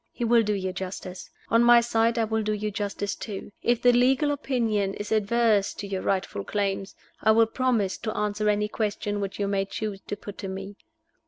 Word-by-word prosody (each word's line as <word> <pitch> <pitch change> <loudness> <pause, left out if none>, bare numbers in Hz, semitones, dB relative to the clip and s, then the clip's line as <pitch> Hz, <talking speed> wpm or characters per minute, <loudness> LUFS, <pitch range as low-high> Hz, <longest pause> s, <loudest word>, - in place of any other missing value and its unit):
He 240 - -3
will 230 0 +5
do 210 -1 0
you 190 -2 -2
justice. 185 0 -6 0.2
On 230 +1 +4
my 240 0 +8
side, 230 0 +1
I 230 - +3
will 220 0 0
do 215 0 -1
you 210 0 -2
justice, 205 -1 -3
too. 205 -2 -7
If 240 -1 +1
the 245 - +7
legal 260 +4 +3
opinion 230 -8 0
is 205 +1 -6
adverse 215 -1 +2
to 205 - -6
your 195 -1 -3
rightful 185 - -1
claims, 195 - -2 0.3
I 220 - +2
will 225 +1 +5
promise 225 -5 0
to 220 -2 -4
answer 210 0 0
any 210 0 +1
questions 205 -1 -2
which 195 -1 -4
you 200 - -1
may 195 -1 0
choose 200 0 -5
to 205 - -4
put 205 0 -9
to 195 - -4
me. 195 +1 -6
210 Hz, 210 wpm, -26 LUFS, 200-230 Hz, 0.3 s, my